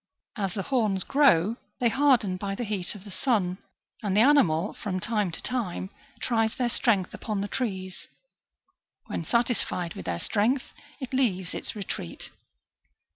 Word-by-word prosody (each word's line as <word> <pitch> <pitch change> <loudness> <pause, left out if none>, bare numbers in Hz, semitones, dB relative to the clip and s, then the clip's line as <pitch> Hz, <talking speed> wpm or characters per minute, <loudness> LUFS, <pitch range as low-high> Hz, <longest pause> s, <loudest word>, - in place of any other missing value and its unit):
As 195 -5 -2
the 195 - -2
horns 215 -8 +1
grow, 230 - +4 0.2
they 240 - +4
harden 250 -8 +3
by 195 +1 -3
the 240 - -3
heat 205 -4 -1
of 195 - -10
the 205 - -11
sun, 190 -4 0 0.4
and 205 -2 0
the - - +7
animal, 205 - +4
from 190 -4 -3
time 210 -1 0
to 165 - -5
time, 205 -6 -2 0.3
tries 225 -2 +1
their 245 -2 0
strength 205 -8 +2
upon 210 -3 -3
the 200 - -2
trees; 190 -5 -4 1.0
when - - -3
satisfied 215 -5 0
with 90 - -8
their 85 -1 -1
strength, 225 - 0 0.3
it 260 -2 -6
leaves 190 -9 +1
its - - -3
retreat. 180 - -6
205 Hz, 155 wpm, -27 LUFS, 185-240 Hz, 1.0 s, the